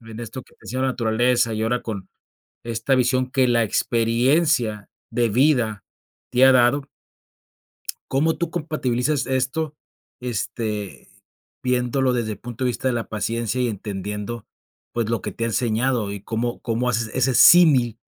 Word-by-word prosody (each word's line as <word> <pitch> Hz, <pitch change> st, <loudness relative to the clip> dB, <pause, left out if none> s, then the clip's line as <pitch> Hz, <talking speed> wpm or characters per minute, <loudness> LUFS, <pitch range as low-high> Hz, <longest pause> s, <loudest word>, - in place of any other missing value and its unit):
en 115 Hz, 0 st, -10 dB
esto 120 Hz, +2 st, -7 dB
que -, -, -25 dB
te -, -, -38 dB
decía 130 Hz, -, -4 dB
de -, -, +1 dB
la -, -, +1 dB
naturaleza, 120 Hz, 0 st, +1 dB
y 110 Hz, -, -2 dB
ahora 120 Hz, +2 st, 0 dB
con 100 Hz, -4 st, -6 dB, 0.6 s
esta 115 Hz, +3 st, 0 dB
visión 130 Hz, 0 st, +1 dB
que 130 Hz, -1 st, +2 dB
la 120 Hz, -1 st, +3 dB
experiencia 115 Hz, +1 st, +1 dB, 0.2 s
de 120 Hz, 0 st, +1 dB
vida 120 Hz, -, +2 dB, 0.5 s
te 125 Hz, +1 st, +4 dB
ha 135 Hz, -, +7 dB
dado 130 Hz, +3 st, +3 dB, 1.2 s
cómo 155 Hz, +4 st, +1 dB
tú 170 Hz, -, -2 dB
compatibilizas 150 Hz, -4 st, -1 dB
esto?, 135 Hz, +4 st, -1 dB, 0.5 s
este, 105 Hz, -, -4 dB, 0.5 s
viéndolo 125 Hz, +1 st, +1 dB
desde 115 Hz, -3 st, -1 dB
el -, -, -8 dB
punto 120 Hz, +1 st, -6 dB
de -, -, +2 dB
vista 125 Hz, +2 st, -1 dB
de 125 Hz, -, 0 dB
la 115 Hz, -1 st, -3 dB
paciencia 115 Hz, +2 st, -2 dB
y 125 Hz, -, +1 dB
entendiendo, 105 Hz, +2 st, -5 dB, 0.5 s
pues, 115 Hz, -2 st, -1 dB
lo 115 Hz, -, 0 dB
que 105 Hz, -, -4 dB
te 115 Hz, -, -3 dB
ha -, -, 0 dB
enseñado, 115 Hz, -1 st, 0 dB
y, 100 Hz, -, -6 dB
cómo 120 Hz, +2 st, -3 dB
cómo 120 Hz, +1 st, -1 dB
haces 115 Hz, -2 st, -1 dB
ese 130 Hz, 0 st, +1 dB
símil 130 Hz, -9 st, +6 dB
120 Hz, 160 wpm, -22 LUFS, 110-130 Hz, 1.2 s, ha